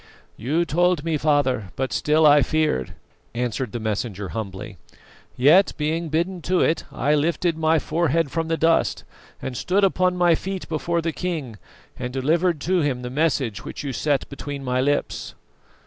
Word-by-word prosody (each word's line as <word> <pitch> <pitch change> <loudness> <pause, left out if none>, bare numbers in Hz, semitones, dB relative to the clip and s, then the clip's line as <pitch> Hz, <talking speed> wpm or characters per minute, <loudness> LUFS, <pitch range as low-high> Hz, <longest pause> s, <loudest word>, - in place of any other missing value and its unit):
"You 155 +9 0
told 175 -1 +1
me, 165 -1 0
father, 145 -9 +1
but 130 0 -2
still 155 +1 +3
I 145 -1 +7
feared," 150 - 0 0.4
answered 120 -1 -2
the 120 - -4
messenger 105 -2 -3
humbly. 105 -2 -6 0.6
"Yet, 155 +10 +5
being 160 +2 -1
bidden 170 +4 -1
to 180 +2 +1
it, 160 - +1
I 145 - 0
lifted 165 +3 +1
my 160 0 +2
forehead 160 -1 0
from 165 -1 -2
the 165 0 0
dust 165 +1 +2 0.4
and 130 - -4
stood 190 +10 +1
upon 185 -1 +2
my 175 -1 +4
feet 190 +3 -4
before 165 +1 -1
the 165 -1 -1
king, 155 - -4 0.4
and 125 -1 -4
delivered 160 +6 +1
to 185 +3 +1
him 130 -4 -1
the 125 - -5
message 130 -9 0
which - - -7
you 140 -2 -3
set 145 +1 0
between 140 0 -7
my 125 0 0
lips." 145 +2 -1
150 Hz, 165 wpm, -23 LUFS, 130-165 Hz, 0.6 s, I